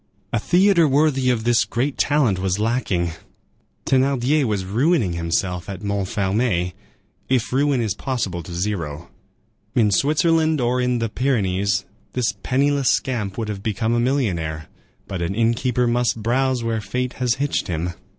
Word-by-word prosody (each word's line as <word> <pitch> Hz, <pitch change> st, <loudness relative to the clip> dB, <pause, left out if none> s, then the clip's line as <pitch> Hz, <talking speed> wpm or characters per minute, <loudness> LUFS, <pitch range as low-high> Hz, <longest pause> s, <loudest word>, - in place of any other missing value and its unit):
A 115 Hz, -, +2 dB
theatre 175 Hz, -, +4 dB
worthy 140 Hz, -2 st, +2 dB
of 120 Hz, -3 st, +1 dB
this 120 Hz, 0 st, +3 dB
great 130 Hz, +4 st, -2 dB
talent 135 Hz, -10 st, +2 dB
was 95 Hz, 0 st, 0 dB
lacking. 105 Hz, -6 st, 0 dB, 0.7 s
Thénardier 135 Hz, +2 st, +2 dB
was 105 Hz, -5 st, -1 dB
ruining 115 Hz, -, +1 dB
himself 85 Hz, +2 st, -2 dB
at 100 Hz, +1 st, -6 dB
Montfermeil, 100 Hz, -1 st, 0 dB, 0.6 s
if 125 Hz, -2 st, 0 dB
ruin 140 Hz, -1 st, +2 dB
is 110 Hz, -4 st, 0 dB
possible 105 Hz, -7 st, -3 dB
to 85 Hz, -, -10 dB
zero; 85 Hz, -5 st, -3 dB, 0.7 s
in 110 Hz, -5 st, +3 dB
Switzerland 155 Hz, -, +2 dB
or 125 Hz, +1 st, +1 dB
in 125 Hz, 0 st, +1 dB
the 115 Hz, -1 st, -1 dB
Pyrenees 100 Hz, -6 st, 0 dB, 0.3 s
this 120 Hz, -4 st, 0 dB
penniless 140 Hz, +1 st, +1 dB
scamp 110 Hz, -7 st, -1 dB
would 115 Hz, -2 st, -2 dB
have 105 Hz, -2 st, -5 dB
become 110 Hz, +2 st, -1 dB
a 120 Hz, -, +2 dB
millionaire; 90 Hz, -, -1 dB, 0.4 s
but 95 Hz, -2 st, -4 dB
an 85 Hz, +3 st, -2 dB
inn 115 Hz, +1 st, +3 dB
keeper 125 Hz, +1 st, 0 dB
must 120 Hz, -2 st, 0 dB
browse 130 Hz, +1 st, +1 dB
where 115 Hz, -1 st, -1 dB
fate 125 Hz, +4 st, -3 dB
has 125 Hz, -2 st, +2 dB
hitched 145 Hz, 0 st, -1 dB
him. 85 Hz, 0 st, -2 dB
115 Hz, 150 wpm, -22 LUFS, 95-130 Hz, 0.7 s, theatre